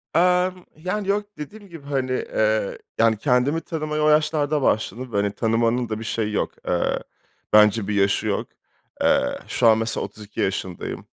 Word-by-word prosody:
Emm, 180 +1 +2
yani, 185 +5 -3
yok, 205 +1 +1
dediğim 200 +7 -9
gibi, 165 -5 -11
hani, 135 -2 -1
eee, 110 -4 0 0.2
yani, 115 -1 +4
kendimi 135 +6 +2
tanımaya 155 -1 -3
o 155 - +5
yaşlarda 150 -1 +2
başladım 120 +1 -1
ve, - - +1
hani, 100 0 +1
tanımanın 115 +2 +1
da 110 0 -3
bir - - -6
şeyi 110 -2 -2
yok. - - 0 0.2
Eee, - - +1 0.5
bence 105 -1 +5
bir 105 - -1
yaşı 100 -1 +2
yok. - - -1 0.5
Eee, - - +2
şu - - +2
an 110 -1 +6
mesela 110 0 -2
32 105 +1 -11
yaşındayım. 95 -2 -3
125 Hz, 165 wpm, -23 LUFS, 110-155 Hz, 0.5 s, an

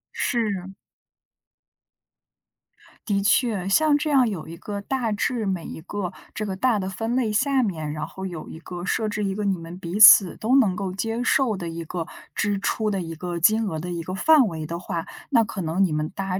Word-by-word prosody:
是。 200 -6 -1 2.3
的 200 -2 +1
确， 205 -2 +1
像 295 +8 +4
这 300 +1 -2
样 265 -5 +4
有 175 -7 -6
一 165 - -8
个 200 +4 -6
大 235 +2 -2
致 220 +2 -1
每 185 -4 -2
一 - - -8
个 185 +1 -5 0.2
这 215 - -3
个 195 -2 -3
大 225 +2 +1
的 190 -1 -3
分 225 +6 -2
类 225 -5 0
下 270 +5 +2
面， 160 -9 -2
然 150 0 -4
后 190 - -8
有 175 -4 -6
一 - - -9
个 175 +1 -7
设 220 +3 0
置 210 0 -2
一 195 -1 -2
个 210 - -3
你 195 -2 +1
们 165 +1 -9
彼 185 +2 -5
此 205 -4 +9
都 240 +5 +1
能 225 -9 +4
够 185 0 -4
接 225 +4 -2
受 245 -3 +2
的 175 - -5
一 165 0 -5
个 165 +1 -5 0.3
支 205 -1 0
出 215 +2 -1
的 195 -2 -1
一 165 -1 -6
个 175 +2 -5
金 215 +6 +3
额 160 -5 -3
的 175 +3 -5
一 170 -1 -3
个 185 +3 -5
范 300 +3 +5
围 160 -4 -5
的 170 +2 -5
话， 170 -1 -4 0.3
那 235 -4 +5
可 210 -3 -5
能 170 +3 +1
你 185 - +1
们 155 0 -1
大 190 -1 -2
195 Hz, 230 characters per minute, -24 LUFS, 175-225 Hz, 2.3 s, 此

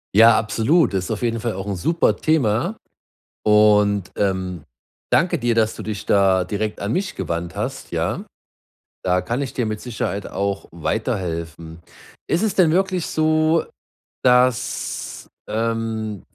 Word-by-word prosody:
Ja, 115 +1 +8
absolut, 115 - +2
ist 95 +2 -2
auf 110 - -3
jeden 115 -1 0
Fall 115 -1 -2
auch 95 +2 -6
'n 100 - -2
super 165 - +1
Thema 155 - +1 0.7
und, 105 -2 +4
ähm, 95 -5 -1 0.5
danke 170 0 +3
dir, 120 -1 +1
dass 110 -1 +1
du - - -7
dich 105 -2 -5
da 95 -2 +4
direkt 105 +2 -3
an 100 +3 -2
mich 190 +4 -1
gewandt 85 0 -4
hast, - - -5
ja? - - -1 0.8
Da 90 0 +2
kann 120 +8 -2
ich 135 - -3
dir 120 - -1
mit 110 -1 -3
Sicherheit 105 -4 -3
auch 100 0 -3
weiterhelfen. 85 - -3 0.5
Ist 170 - +1
es 215 -2 0
denn 170 -4 +4
wirklich 185 -1 +1
so, 155 +1 +2 0.6
dass, 125 +1 +1 0.2
ähm 110 -2 -2
110 Hz, 145 wpm, -21 LUFS, 100-130 Hz, 0.8 s, Ja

